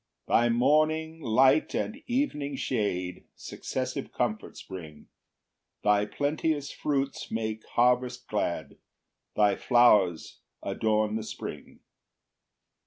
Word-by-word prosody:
2 - - -4
Thy 120 +1 +5
morning 155 +6 +2
light 130 +5 +3
and 250 +6 -3
evening 195 - -1
shade 95 -9 -2
Successive - - -5
comforts - - -3
bring; 80 -5 -10 0.7
Thy 105 0 +3
plenteous 145 +2 -1
fruits 140 -2 -2
make 110 -1 -3
harvest 125 +1 +2
glad, 100 -5 -2 0.6
Thy 105 -2 +4
flowers 105 -9 +3 0.2
adorn 110 0 0
the 110 - -4
spring. - - -8
120 Hz, 100 wpm, -28 LUFS, 105-145 Hz, 0.7 s, Thy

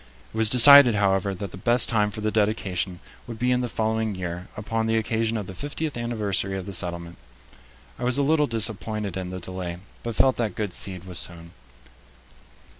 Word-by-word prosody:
It - - -8
was 110 -1 +7
decided, 130 0 +9
however, 95 -1 0
that 100 0 -7
the - - -10
best 120 +5 +3
time 105 -3 +1
for 105 +1 -8
the 110 0 -1
dedication 100 -4 -2 0.3
would 115 -2 -8
be 125 +2 0
in 125 0 +1
the 125 - -3
following 110 -1 -2
year, 90 0 -6
upon 110 +2 -3
the 115 0 +1
occasion 110 +1 -1
of 105 - -5
the 95 - -9
fiftieth 145 - -5
anniversary 105 -5 -3
of 95 - -7
the 100 - -8
settlement. 85 -1 -3 0.8
I - - -6
was 125 +1 +1
a 140 - +1
little 150 +1 +2
disappointed 110 -3 -3
in 95 -1 -5
the 95 0 -6
delay, 90 -1 -7 0.2
but 115 -1 -6
felt 130 -1 +2
that 110 -6 -3
good 105 -4 -4
seed 90 -2 +1
was 90 -2 -2
sown. 85 -1 -6
105 Hz, 195 wpm, -24 LUFS, 95-115 Hz, 0.8 s, decided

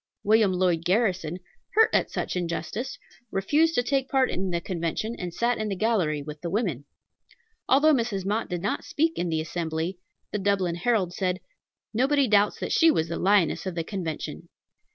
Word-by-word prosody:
William 215 -1 +4
Lloyd 180 -3 +1
Garrison, 180 -3 +1 0.4
hurt 445 +1 +6
at - - +2
such - - -3
injustice, 180 +8 -3 0.3
refused 300 +13 +2
to 245 - +2
take 270 +1 0
part 265 -1 +2
in 190 +1 -2
the 170 -1 0
Convention, 175 +6 -3
and 180 -2 -4
sat 235 +6 0
in 215 -1 -2
the 195 - -2
gallery 180 -9 +1
with 150 0 -8
the 170 - -3
women. 175 - -1 0.8
Although 290 +4 +5
Mrs. 225 -7 -1
Mott 210 +3 -1
did 175 -1 -3
not 205 - -1
speak 325 +2 0
in 175 - -2
the 160 -1 0
assembly, 165 +2 -3 0.3
the 210 - -2
Dublin 190 -3 +1
Herald 185 0 0
said, 185 0 -1 0.5
"Nobody 270 +4 +3
doubts 205 -1 +3
that - - -3
she 330 - +5
was 160 - +1
the 170 - -3
lioness 195 -2 +2
of 185 - -4
the 165 - -1
Convention." 165 -4 -5
195 Hz, 180 wpm, -26 LUFS, 170-230 Hz, 0.8 s, hurt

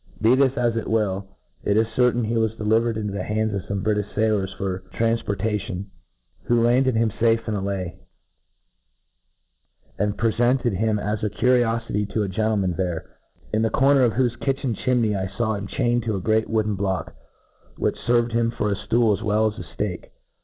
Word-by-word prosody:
Be 115 +3 +4
this 130 0 +3
as 120 -1 +1
it 115 - -3
will, 100 -3 0 0.4
it 100 - +2
is 110 - +4
certain 125 -1 +3
he 115 +2 -1
was 110 -1 +1
delivered 110 +1 +1
into 105 -2 -3
the 100 - -3
hands 110 +2 -1
of 100 - -2
fome 100 -1 -3
Britifti 105 -1 -1
failors 105 -3 +1
for 95 -2 -2 0.2
tranf* 115 0 +1
portation, 100 -1 -2 0.6
who 120 0 +3
landed 125 +1 +3
ham 110 -1 +2
fafe 115 +2 +1
in 110 - -1
Ilay, 95 -3 -3 2.0
and 105 +1 0
pre 115 -1 +1
fcnted 120 -1 +2
him 110 +2 +1
as 105 +1 -2
a 105 - +1
curiofity 115 -1 +1
to 110 - +2
a - - -2
gentleman 100 -1 0
there 90 -2 -2
j— - - -26 0.5
in - - +2
the 115 - +2
corner 135 +4 +4
of 120 -3 +3
whofe 120 0 0
kitchen 135 -3 -1
chimney 115 -2 +1
I 95 -1 -2
faw 115 -2 +1
him 100 -1 -4
chained 120 0 0
to 110 -2 0
a - - -2
great 110 +3 +1
wooden 110 -1 +1
block, 95 -2 -2 0.6
which - - 0
ferved 120 0 +3
him 115 0 +1
for 105 -3 -1
a - - +1
ftool 115 +1 +2
as 100 - -9
well 110 0 +2
zs 105 - -11
a 90 - -11
ftakc. 95 -4 -3
110 Hz, 195 wpm, -23 LUFS, 100-115 Hz, 2.0 s, Be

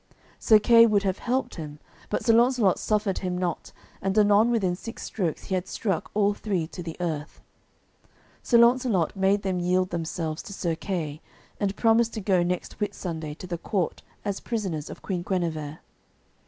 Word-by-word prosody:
Sir 220 - +6
Kay 230 +2 +6
would 205 -2 +2
have 190 -1 -1
helped 255 -2 -1
him, 150 -2 -7 0.3
but - - -2
Sir 230 - +5
Launcelot 235 -4 +4
suffered 210 -3 0
him 180 -1 -2
not, 180 -2 -3 0.3
and 195 +2 -1
anon 210 +2 +5
within 195 -7 +1
six 225 +5 -8
strokes 175 -7 -3
he - - -5
had 185 -1 -1
struck 195 -6 -2
all 205 -1 +3
three 195 -5 -2
to 175 +3 -8
the 165 -2 -7
earth. 160 -4 -4 1.0
Sir 235 - +3
Launcelot 235 -7 +3
made 195 +1 +2
them 185 -2 -1
yield 180 +1 +1
themselves 165 -1 -3
to 205 - -9
Sir 175 -3 -1
Kay 160 -3 -4 0.4
and 200 -1 -1
promise 230 0 +3
to 225 - -6
go 190 -3 +2
next 180 +2 -3
Whitsunday 165 -7 -4
to - - -8
the 175 -2 -4
court 190 -2 -2 0.2
as 200 -1 -2
prisoners 190 -10 -3
of - - -10
Queen 185 -3 -2
Guenever. 165 -5 -3
190 Hz, 175 wpm, -26 LUFS, 175-215 Hz, 1.0 s, Sir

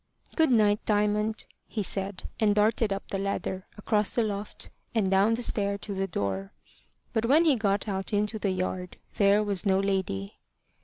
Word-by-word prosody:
"Good 320 -3 +4
night, 215 -4 +3
Diamond," 210 +1 +1 0.2
he 215 - -3
said, 195 0 -1
and 210 -3 +3
darted 215 0 +2
up 195 0 -3
the 195 - -1
ladder, 190 -1 -3
across 210 0 +1
the 235 - +3
loft, 205 -1 -4 0.2
and 200 -4 +2
down 200 +4 +4
the 240 - -3
stair 200 -3 +1
to 200 0 -7
the 195 0 -1
door. 100 - -3 0.6
But 225 +1 +1
when 310 +6 +5
he 300 -4 +5
got 205 -2 0
out 195 0 -3
into 210 +1 0
the 200 - 0
yard, 185 -1 -3 0.2
there 200 +1 +4
was 200 -3 -1
no 190 -2 +3
lady. 190 - -2
205 Hz, 175 wpm, -28 LUFS, 195-215 Hz, 0.6 s, when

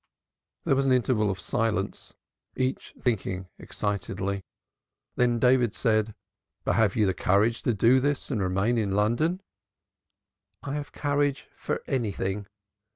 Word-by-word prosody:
There 135 - +2
was 135 0 +1
an - - +3
interval 120 -4 +2
of 95 -1 -3
silence, 110 -1 -2 0.4
each 130 0 -2
thinking 95 -6 -1
excitedly. 100 -1 -3 0.7
Then 120 -1 +2
David 125 -2 +3
said: 110 -2 +1 0.5
"But - - +1
have 110 -4 +3
you 110 - +3
the 95 - +2
courage 105 +6 +2
to 120 - +1
do 115 +6 +5
this 145 +1 -1
and 115 -6 0
remain 95 +6 +1
in 100 -3 0
London?" 120 - +1 1.2
"I 140 - -4
have 145 0 -4
courage 145 -1 -1
for - - -3
anything. 100 -5 -2
115 Hz, 135 wpm, -27 LUFS, 100-130 Hz, 1.2 s, do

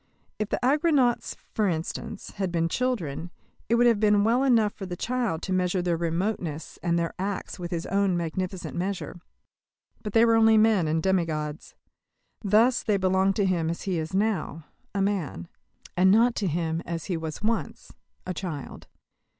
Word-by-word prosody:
If 215 -1 -2
the - - -1
Argonauts, 280 -3 +2 0.2
for 215 -2 +1
instance, 165 -2 -4
had 190 -2 -1
been 165 -1 +1
children, 175 - -2 0.4
it 235 - +4
would 240 +1 +4
have 230 -3 +4
been 210 -1 +4
well 235 +5 +3
enough 225 -6 +3
for 195 - -7
the 175 - -4
child 235 -10 -1
to 190 - -2
measure 185 0 +1
their 175 -1 +1
remoteness 170 -1 -3
and 170 -1 +1
their 170 -1 -1
acts 195 0 -4
with 175 -1 -5
his 170 -2 -3
own 195 -2 +1
magnificent 180 +2 -4
measure. 180 -1 -4 0.8
But 210 - -6
they 230 0 +6
were 230 - +4
only 225 -1 +5
men 215 -6 +4
and 160 +1 0
demi 190 -2 +2
gods. 155 -1 -5 0.7
Thus 220 +5 +4
they 210 -3 +1
belong 190 +1 +2
to 200 0 +1
him 170 -4 +1
as 170 - -4
he 185 -4 -1
is 160 0 -4
now 190 -7 -1 0.3
a 195 - +2
man; 180 - -2 0.5
and 185 +1 +5
not 230 +5 +5
to 200 - 0
him 165 0 -1
as 165 -1 -5
he 185 - -2
was 160 +3 -5
once 225 +1 -2 0.3
a 185 - -3
child. 165 -5 -6
190 Hz, 180 wpm, -26 LUFS, 170-215 Hz, 0.8 s, they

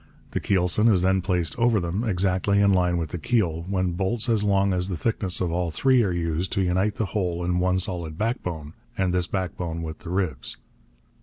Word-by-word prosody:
The - - -1
keelson 95 +4 +2
is 90 -3 +3
then 95 0 +2
placed 90 -3 0
over 115 -2 +3
them, 90 +5 -2
exactly 100 -1 +1
in 100 -1 +4
line 90 -1 +2
with 80 -3 -3
the 90 - -4
keel, 90 -7 0
when 95 -2 0
bolts 100 +7 -1
as 110 -3 +3
long 100 -1 +2
as 90 +1 0
the 90 - -3
thickness 100 -1 0
of 90 -2 -1
all 85 0 -1
three 130 +10 +3
are 100 -5 +1
used 85 +1 -2
to 100 - +1
unite 95 +4 +1
the 110 - -1
whole 90 -4 -2
in 90 0 0
one 90 +1 +2
solid 85 -4 -1
backbone, 90 - -3 0.2
and 95 -2 +1
this 90 -1 +1
backbone 85 -3 -3
with 80 -1 -6
the 85 - -9
ribs. 90 -9 -2
90 Hz, 210 wpm, -25 LUFS, 85-100 Hz, 0.2 s, in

